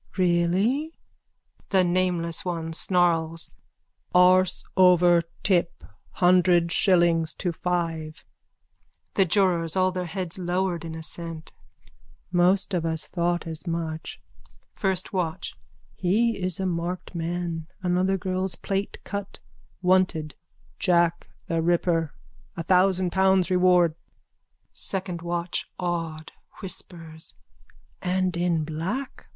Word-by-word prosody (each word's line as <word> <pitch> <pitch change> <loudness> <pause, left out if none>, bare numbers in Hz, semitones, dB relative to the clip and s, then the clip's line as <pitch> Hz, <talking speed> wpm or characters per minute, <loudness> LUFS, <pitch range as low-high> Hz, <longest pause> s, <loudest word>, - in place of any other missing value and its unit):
_ - - -19
Really? 190 - +1 0.7
THE 190 -2 +4
NAMELESS 175 -2 0
ONE: 165 -2 -3
(Snarls.) 165 -2 +1 0.6
Arse 185 0 +4
over 180 -2 +6 0.2
tip. 175 -4 +1 0.3
Hundred 175 -1 +4
shillings 170 -4 +3
to 180 - -2
five. 165 -3 -3 0.9
THE 195 - +4
JURORS: 175 -3 +2
(All 185 0 +3
their 180 -1 -3
heads 180 0 -4
lowered 180 -1 -1
in 165 -1 -6
assent.) 160 0 -6 0.8
Most 185 +3 +2
of 175 -3 0
us 160 -1 -2
thought 175 0 -1
as 160 +2 -7
much. 165 -1 -4 0.5
FIRST 190 -2 -1
WATCH: 175 -4 -2 0.4
He 220 +6 +1
is 185 -1 -2
a 190 - -1
marked 175 +1 -3
man. 170 -1 -3 0.2
Another 185 +2 +2
girl's 185 0 -2
plait 195 0 -3
cut. 200 -1 -5 0.4
Wanted: 180 -4 +2 0.5
Jack 170 -2 +2 0.2
the 165 -1 0
Ripper. 165 -2 +1 0.5
A 165 - -3
thousand 185 0 +3
pounds 190 -1 +3
reward. 180 -2 +4 0.8
SECOND 185 -3 -3
WATCH: 175 0 -3
(Awed, 165 -3 -3 0.3
whispers.) 165 -4 -5 0.7
And 185 -1 0
in 170 -2 +1
black. 170 - -4
175 Hz, 110 wpm, -25 LUFS, 165-185 Hz, 0.9 s, over